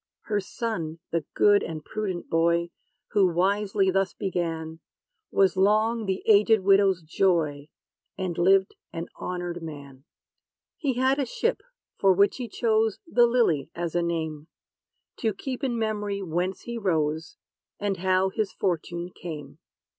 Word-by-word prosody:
Her 210 -2 -1
son, 185 -6 -4
the 165 -3 -1
good 205 -1 +5
and 155 -2 -6
prudent 200 -5 -4
boy, 170 +1 +2 0.4
Who 200 -2 +4
wisely 195 +2 +1
thus 195 0 0
began, 165 -4 -3 0.5
Was 195 -1 +3
long 215 +3 +2
the 190 0 -1
aged 215 0 +5
widow's 195 -2 +4
joy; 155 -4 +1 0.5
And 185 -3 -2
lived 190 +3 +3 0.2
an 165 +1 -5
honored 175 -1 -4
man. 140 -4 -9 0.7
He 280 -5 -1
had 260 +3 +2
a 275 - +1
ship, - - -1 0.4
for 195 -1 +5
which 200 +2 +3
he 250 -2 -4
chose 220 -1 +1
"The 240 -7 +4
LILY" 225 - +2
as 170 -1 -3
a 175 - +1
name, 160 -3 -3 0.7
To 220 -4 -1
keep 260 +5 -5
in 245 -3 0
memory 210 -3 -2
whence 180 +2 -2
he 235 -1 -5
rose, 160 -5 -1 0.4
And 200 -2 -1
how 185 +1 +2
his 200 0 -2
fortune 175 -1 -2
came.' 155 -5 -8
190 Hz, 140 wpm, -26 LUFS, 170-210 Hz, 0.7 s, good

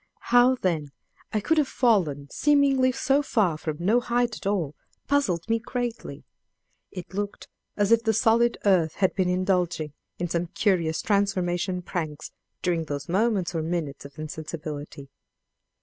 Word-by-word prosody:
How, 245 +1 +6
then, 165 - -1 0.4
I 215 - +1
could 315 +10 +2
have 290 - +2
fallen 175 - +1
seemingly 280 -3 +3
so 270 +2 +2
far 210 - +1
from 155 -1 -4
no 210 +8 +3
height 240 -1 0
at - - -6
all, 175 -8 0 0.3
puzzled 210 - +1
me 230 0 +1
greatly: 245 0 -5 0.7
it 180 0 -9
looked 205 +1 -4 0.3
as 205 0 +2
if 230 0 +6
the 225 - +3
solid 230 +2 +3
earth 175 -6 +3
had 190 -2 +2
been 185 -2 +1
indulging 180 -4 0 0.2
in 175 - -2
some 170 +1 -1
curious 170 -4 0
transformation 185 -3 0
pranks 155 -4 -4 0.3
during 170 -3 0
those 145 -1 -5
moments 195 -1 +1
or 165 - -1
minutes 160 -4 -3
of 140 0 -12
insensibility. 150 -2 -7
185 Hz, 150 wpm, -26 LUFS, 160-230 Hz, 0.7 s, How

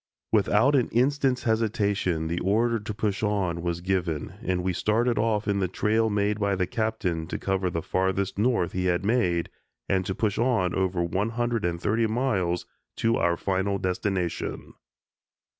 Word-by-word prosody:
Without 110 +5 +3
an 130 -4 +2
instant's 130 +1 +1
hesitation, 105 -7 0
the 85 +2 -2
order 115 +4 +1
to 105 +1 -6
push 105 -2 -2
on 95 -5 0
was 85 0 -2
given, 90 -4 -1
and 90 0 -1
we 95 0 0
started 115 +6 +1
off 110 -1 0
in 100 -1 +1
the 95 - +1
trail 110 +4 +1
made 105 0 0
by 100 -1 +1
the 90 0 0
Captain 105 -7 -2
to - - -3
cover 95 -1 -1
the 85 -2 -3
Farthest 95 +1 0
North 115 -6 +2
he 90 0 -2
had 90 +1 +1
made 90 -7 +1 0.4
and 95 -1 +1
to 95 - -2
push 110 -2 0
on 115 -8 +2
over 95 -2 0
one 95 +5 -1
hundred 120 -1 -1
and 85 -1 -1
thirty 110 +5 +1
miles 105 -7 0 0.3
to 115 +1 +1
our 85 -1 +1
final 100 +1 0
destination. 90 -1 -2
100 Hz, 170 wpm, -26 LUFS, 90-110 Hz, 0.4 s, Without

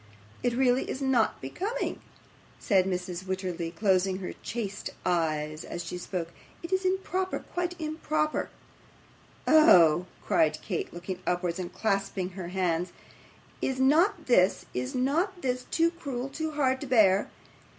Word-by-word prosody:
It 245 -1 0
really 255 0 +2
is - - -3
not 265 -5 +2
becoming,' 405 - -3 0.6
said 190 -5 +3
Mrs. 180 -1 -3
Wititterly, 185 -3 -3
closing 190 +1 +1
her 185 -1 -5
chaste 205 -3 -4 0.2
eyes 155 -3 0
as 175 - -5
she 180 +1 -5
spoke; 175 -2 -4 0.3
'it 335 +3 -4
is 375 0 +2
improper 375 0 0 0.2
quite 355 0 -2
improper.' 310 -1 -1 1.0
'Oh!' 180 - +6 0.2
cried 155 -1 +3
Kate, 185 -5 -3
looking 175 +1 -6
upwards 175 0 0
and 180 -1 -4
clasping 195 -2 -1
her 185 -2 -7
hands; 180 -1 -1 0.7
'is 260 -1 -1
not 320 +6 +3
this, 195 -6 +3
is 125 0 -3
not 325 +9 +1
this, 255 -1 -1
too 335 0 +2
cruel, 275 -6 -5
too 315 +3 -3
hard 265 -3 +1
to 285 - -5
bear! 205 -5 +4
205 Hz, 140 wpm, -28 LUFS, 180-300 Hz, 1.0 s, Oh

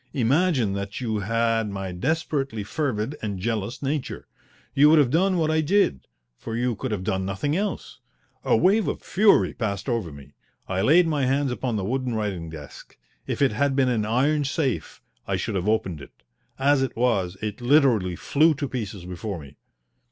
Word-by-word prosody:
Imagine 135 - +2
that 100 +1 -4
you 110 -4 -2
had 115 +1 0
my 95 -2 -5
desperately 135 - -2
fervid 130 +1 -2
and 105 -3 -3
jealous 115 +5 -3
nature. 140 0 -3 0.5
You 145 +2 +6
would 160 - +6
have 140 -5 +4
done 185 +4 +2
what 160 -2 +1
I 160 0 +2
did, 155 - +1 0.3
for 115 - -5
you 120 0 0
could 130 +5 -4
have 105 -4 -3
done 95 0 -1
nothing 100 +11 -2
else. 200 +1 -3 0.4
A - - +3
wave 200 - +3
of - - -3
fury 205 +2 +3
passed 100 -2 -3
over 115 - -1
me. 70 -1 -13 0.3
I 95 0 -1
laid 160 - +5
my 150 -5 0
hands 135 0 +1
upon 125 -1 -2
the 100 -3 -2
wooden 125 +1 -1
writing 100 -7 -3
desk. 75 -3 -11 0.3
If - - 0
it 135 - +3
had 140 -1 0
been 135 -2 +3
an 115 -4 +1
iron 140 +6 +2
safe 135 -2 -2 0.2
I 95 - 0
should 100 +4 -3
have 95 +1 -1
opened 95 -8 -1
it. 65 - -15 0.3
As 140 +1 +3
it 135 - -2
was, 100 -7 +1
it 105 +2 -5
literally 120 - +3
flew 155 - +3
to 140 +1 -3
pieces 105 -8 -5
before 90 +1 -5
me. 70 -2 -13
120 Hz, 185 wpm, -24 LUFS, 100-145 Hz, 0.5 s, You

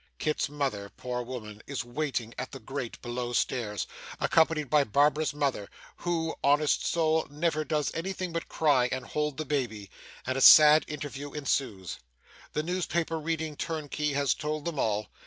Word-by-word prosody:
Kit's 150 -1 -1
mother, 135 -9 -2
poor 125 +2 -4
woman, 110 -4 -7
is 140 -4 -3
waiting 120 -3 -3
at 130 - -5
the 135 - -8
grate 130 0 -5
below 120 0 -3
stairs, 110 -6 -1 0.3
accompanied 160 -2 +3
by 150 +2 +4
Barbara's 145 +5 +2
mother 140 -8 -1 0.3
(who, 165 -2 -1
honest 145 +2 +3
soul! 160 -1 +2
never 155 +1 0
does 150 -2 -1
anything 185 +1 -3
but 165 - -3
cry, 140 -6 +3
and 130 0 -3
hold 150 -2 -2
the 155 - -3
baby), 115 -9 -2 0.3
and 130 +1 -1
a - - -2
sad 155 +2 +9
interview 145 -1 -6
ensues. 130 - -2 0.5
The 150 - 0
newspaper 170 -2 -1
reading 160 -1 -2
turnkey 150 -2 -2
has 140 -1 +2
told 150 0 -4
them 165 -5 -3
all. 105 -3 0
145 Hz, 155 wpm, -29 LUFS, 125-155 Hz, 0.5 s, sad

